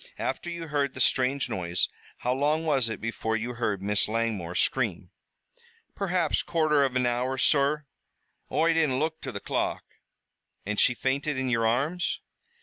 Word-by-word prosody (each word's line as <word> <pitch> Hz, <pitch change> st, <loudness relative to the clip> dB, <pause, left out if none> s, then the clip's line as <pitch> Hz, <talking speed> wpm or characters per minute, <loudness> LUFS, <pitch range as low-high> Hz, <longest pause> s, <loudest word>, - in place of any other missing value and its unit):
After 135 Hz, +6 st, -3 dB
you 170 Hz, -2 st, -6 dB
heard 140 Hz, -2 st, 0 dB
the -, -, -7 dB
strange 130 Hz, +1 st, +2 dB
noise 85 Hz, -1 st, 0 dB, 0.3 s
how 125 Hz, -, 0 dB
long 150 Hz, +4 st, +1 dB
was 135 Hz, -7 st, +2 dB
it 110 Hz, -, -4 dB
before 110 Hz, 0 st, -2 dB
you 115 Hz, +2 st, -2 dB
heard 105 Hz, -5 st, -2 dB
Miss 105 Hz, +1 st, +2 dB
Langmore 105 Hz, -6 st, -1 dB
scream?" -, -, 0 dB, 0.8 s
"Perhaps 180 Hz, -5 st, +1 dB
quarter 155 Hz, -3 st, +2 dB
av 130 Hz, -2 st, 0 dB
an 125 Hz, -1 st, +2 dB
hour, 125 Hz, +2 st, 0 dB
sur. 145 Hz, +2 st, +2 dB, 0.7 s
Oi 165 Hz, +1 st, +3 dB
didn't 155 Hz, -6 st, +2 dB
look 160 Hz, +2 st, -1 dB
to 135 Hz, -, -5 dB
the 100 Hz, -, -5 dB
clock." -, -, -1 dB, 0.8 s
"And 105 Hz, +1 st, -1 dB
she 125 Hz, -, +4 dB
fainted 140 Hz, +3 st, -1 dB
in 130 Hz, -1 st, -1 dB
your 115 Hz, -2 st, +2 dB
arms?" 150 Hz, +10 st, 0 dB
130 Hz, 160 wpm, -27 LUFS, 115-150 Hz, 0.8 s, she